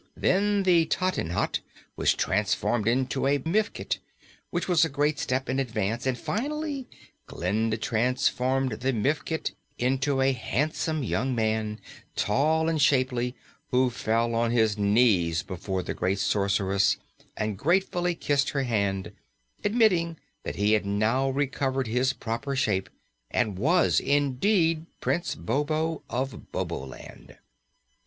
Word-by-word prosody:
Then 200 +1 +2
the 170 -3 +4
tottenhot 185 - 0 0.4
was - - +2
transformed 105 +2 0
into 130 +2 +1
a 140 +1 +3
mifket, 185 +10 -1 0.5
which 175 - -2
was 175 -4 +4
a 160 - +1
great 145 +1 0
step 130 +1 -1
in 130 +1 0
advance 115 -1 -1
and, 130 -2 0
finally, 285 - -3 0.4
Glinda 110 +5 -1
transformed 125 +3 +1
the 130 +2 0
mifket 150 +7 -1 0.3
into 135 +2 +1
a 135 0 +4
handsome 150 +5 -1
young 125 +2 -1
man, 110 -1 -1 0.4
tall 155 +9 +2
and 160 -2 +1
shapely, 130 -2 +2 0.3
who 125 -1 +3
fell 115 +1 0
on 115 0 +1
his 110 -3 +2
knees 100 -6 +3
before 95 0 -4
the - - -3
great 95 +2 0
Sorceress 100 0 +2 0.4
and 105 -1 -1
gratefully 175 - +1
kissed 140 -3 +1
her 140 -2 -1
hand, 100 -5 -1 0.5
admitting 195 -7 +2 0.2
that - - -5
he 105 +1 +2
had 105 - +3
now 110 +7 +1
recovered 135 -1 -1
his 125 +4 +1
proper 120 +3 -4
shape 105 -7 0 0.4
and 105 -6 0
was 170 - +3
indeed 160 +4 +1
Prince 175 0 -1
Bobo 150 - -1
of 130 +2 -4
Boboland. 65 -1 -6
130 Hz, 125 wpm, -27 LUFS, 110-155 Hz, 0.5 s, the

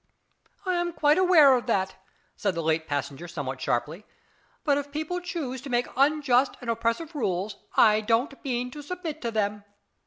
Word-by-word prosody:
"I 370 - +1
am 345 0 -1
quite 300 0 +3
aware 320 -8 +7
of 245 0 -2
that," 190 -4 +1 0.4
said 200 -4 -1
the 165 - -2
late 160 0 0
passenger 145 +3 -3
somewhat 140 -6 -5
sharply, 150 - -1 0.6
"but 290 -2 +3
if 285 0 -7
people 315 +4 -3
choose 280 -8 -4
to 280 - -8
make 245 0 +1
unjust 275 -2 +3
and 240 -2 -2
oppressive 230 +8 -1
rules 205 - -2 0.2
I 215 -1 +6
don't 245 +5 0
mean 250 -2 -2
to 295 - -8
submit 325 0 -6
to 235 - -2
them. 210 -2 -1
245 Hz, 175 wpm, -26 LUFS, 200-300 Hz, 0.6 s, aware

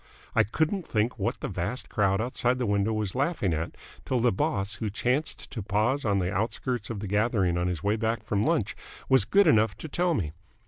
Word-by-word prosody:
I - - +5
couldn't 160 - -1
think 110 +2 0
what - - -1
the - - -2
vast 100 +9 -3
crowd 100 -2 +1
outside 125 +1 0
the 125 - -1
window 100 0 +1
was 105 -3 -1
laughing 135 - 0
at 80 +1 -3 0.3
till 130 - 0
the 120 +1 +3
boss, 95 +1 -1
who 110 - 0
chanced 125 +8 -1
to 115 - -4
pause 110 +8 0
on 100 -2 +2
the 90 0 0
outskirts 110 +2 -2
of 110 -4 -4
the 105 - -4
gathering 105 -3 +1
on 90 0 0
his 90 -4 -3
way 105 +2 +2
back 115 +1 -1
from 100 -1 0
lunch, 110 -9 +1 0.3
was 130 -1 +5
good 200 0 +4
enough 110 0 +4
to - - -7
tell 175 +2 +1
me. 80 - -1
110 Hz, 215 wpm, -27 LUFS, 100-125 Hz, 0.3 s, I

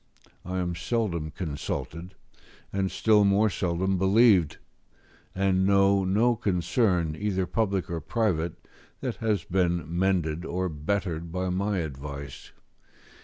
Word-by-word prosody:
I 90 +1 -4
am 90 -1 -1
seldom 85 -4 -1
consulted, 85 +1 -5 0.6
and 95 -1 0
still 105 0 +3
more 100 +2 +3
seldom 95 +1 0
believed, 95 -4 +4 0.8
and 95 -1 +2
know 100 0 +4
no 110 +6 +3
concern, 90 -4 +1
either 95 -1 -1
public 100 -2 -1
or 85 -1 -4
private, 85 -4 -1 0.3
that - - -3
has 110 -3 0
been 85 -3 0
mended 85 -2 0
or 90 +2 -2
bettered 85 +1 -3
by 90 +1 -2
my 100 +3 0
advice. 70 -2 -7
95 Hz, 120 wpm, -27 LUFS, 85-100 Hz, 0.8 s, believed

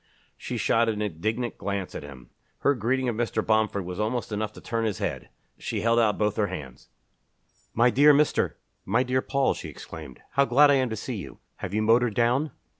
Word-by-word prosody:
She - - -5
shot 115 0 +2
an 105 -2 -2
indignant 110 +5 -2
glance 100 -2 -3
at - - -5
him. 70 -4 -12 0.3
Her 140 - +4
greeting 130 +2 0
of 120 - -1
Mr. 115 -1 -1
Bomford 110 -3 +1
was 90 +2 -6
almost 115 +2 -2
enough 105 0 -2
to - - -11
turn 115 -1 -2
his 110 -4 -1
head. - - -4 0.3
She - - -3
held 115 +1 +3
out 110 -3 +2
both 105 -1 0
her 105 -2 +2
hands. 75 -9 -8 0.9
"My 120 +2 +4
dear 145 +4 +6
Mr. 150 +1 +2 0.3
my 125 +2 +2
dear 130 0 0
Paul!" 140 0 +1
she - - -7
exclaimed. 75 -5 -10
"How 140 - +3
glad 145 +3 +5
I 135 -2 +4
am 130 - -1
to 110 - -3
see 115 +2 -5
you! 95 - -8 0.2
Have 100 - -5
you 110 - +1
motored 115 0 +3
down?" 125 +6 +2
115 Hz, 205 wpm, -26 LUFS, 105-125 Hz, 0.9 s, dear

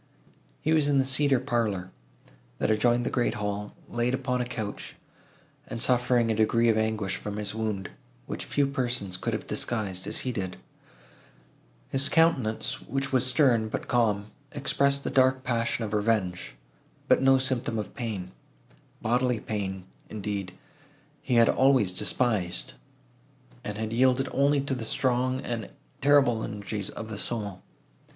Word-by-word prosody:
He 155 - +1
was 155 -2 +3
in 145 -1 +3
the 135 - +3
cedar 135 0 +3
parlour, 110 -8 -1 0.7
that - - +1
adjoined 120 +3 +2
the - - -1
great 120 -2 0
hall, 105 -1 -4
laid 120 +2 0
upon 125 -1 -1
a - - -1
couch, 110 -4 -5 0.7
and 115 - -5
suffering 125 -1 +3
a - - +1
degree 115 +2 +3
of 110 - +4
anguish 110 -3 -1
from 105 +1 -6
his 105 -1 -3
wound, 110 -4 -3 0.3
which - - -5
few 145 - +1
persons 120 -8 -1
could - - -3
have - - -3
disguised, 100 -6 -2
as - - +1
he 130 - 0
did. 95 -5 -4 1.3
His 135 +1 +3
countenance, 145 -10 +2
which 135 0 -3
was 130 0 +4
stern, 125 -5 +3
but - - -4
calm, 105 -4 +1 0.2
expressed 140 0 +1
the - - -3
dark 130 0 +3
passion 120 -1 0
of 105 -1 -4
revenge, 105 -4 0 0.5
but - - +4
no 135 0 +5
symptom 130 -3 0
of 105 - -4
pain; 105 -8 -4 0.7
bodily 125 +1 +1
pain, 95 -4 -4 0.3
indeed, 100 -3 -4 0.7
he 125 - 0
had 115 -1 +6
always 130 -8 +4
despised, 90 - 0 0.9
and 105 0 -5
had 110 0 -3
yielded 130 +2 +3
only 140 +1 +3
to 140 0 -3
the 125 -3 -3
strong 130 +2 0
and 115 -4 -4 0.3
terrible 135 -5 +4
energies 105 -1 -4
of 110 - -7
the 105 -2 -5
soul. 105 -6 -3
115 Hz, 150 wpm, -27 LUFS, 105-130 Hz, 1.3 s, had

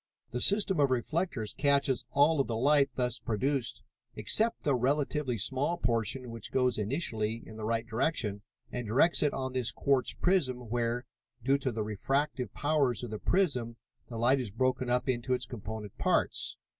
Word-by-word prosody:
"The 125 - -2
system 200 - +4
of 140 -2 +4
reflectors 130 - -1
catches 140 -3 +2
all 145 +4 +4
of - - -2
the 115 - -2
light 140 +2 +4
thus 125 -1 -1
produced 120 +3 -1 0.3
except 215 - +1
the 145 - +2
relatively 135 0 0
small 135 - 0
portion 120 - 0
which 115 -2 -7
goes 125 -3 +1
initially 110 -2 -2
in 110 - -11
the 110 -1 -5
right 115 +1 0
direction, 115 -4 -1 0.3
and 125 -2 -4
directs 140 +10 +3
it 150 - +3
on 130 -1 -3
this 125 -3 -1
quartz 135 -2 +1
prism 130 - 0
where, 120 +1 -1 0.4
due 135 +3 +3
to 135 -2 -1
the 110 -1 -2
refractive 125 +3 -1
powers 145 -5 +1
of 120 - -5
the 110 - -4
prism, 130 -12 0 0.3
the 115 - -6
light 125 +4 +3
is 125 -4 -2
broken 130 +3 0
up 125 +2 +1
into 125 0 0
its 125 - -4
component 110 -3 -7
parts. - - 0
125 Hz, 170 wpm, -30 LUFS, 115-140 Hz, 0.4 s, system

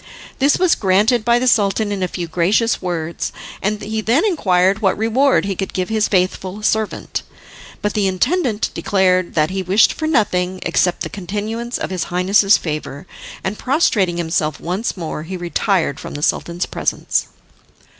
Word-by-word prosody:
This 280 +2 +3
was 365 -2 +3
granted 215 +5 +2
by 235 +1 +3
the 250 - 0
Sultan 205 -2 +2
in 200 -2 -3
a 185 - +1
few 175 -1 -5
gracious 195 +8 +1
words, 170 -2 -3 0.3
and 210 +1 -1
he 220 +1 -2
then 245 - +2
inquired 195 - +2
what 195 -3 +2
reward 230 +4 +2
he 195 -1 -2
could 195 +1 -4
give 185 -1 -2
to - - -3
his 215 -1 +2
faithful 185 +1 -1
servant. 215 0 -1 0.6
But 210 - 0
the 205 -2 +1
intendant 240 - 0
declared 185 -2 +1
that 155 +1 +2
he 190 0 -2
wished 190 +4 +4
for 315 - -3
nothing 185 - +1
except 180 -1 +1
the - - -4
continuance 215 +5 -4
of - - -4
his 180 -3 -2
Highness's 195 +3 +3
favour, 150 -1 -5 0.4
and 195 +2 -3
prostrating 215 - +1
himself 160 -3 -1
once 190 +6 -3
more, 160 -3 -4
he 185 +4 -6
retired 175 -2 0
from - - -8
the 145 - -5
Sultan's 170 +2 0
presence. - - -1
195 Hz, 170 wpm, -19 LUFS, 180-220 Hz, 0.6 s, wished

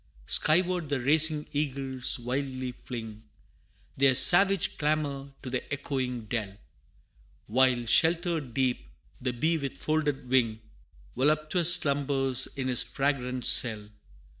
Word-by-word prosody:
Skyward 175 - +1
the 145 -2 -2
racing 150 +3 +3
eagles 135 -3 +1
wildly 130 +1 -5
fling 115 -3 -9 0.8
Their 135 -1 +3
savage 195 +5 +5
clamor 145 -2 -2
to 130 - -7
the 125 +2 -5
echoing 130 -4 -4
dell 105 -3 -5 0.9
While 125 +1 +1
sheltered 160 -2 +1
deep, 130 -2 -2 0.3
the 125 0 -2
bee 160 +7 -1
with 140 -2 -6
folded 150 -4 -2
wing, 120 -4 0 0.6
Voluptuous 155 +5 +2
slumbers 140 -4 0
in 130 -1 -3
his 125 -2 +1
fragrant 130 -3 -3
cell. 105 -3 +3
135 Hz, 115 wpm, -27 LUFS, 125-155 Hz, 0.9 s, savage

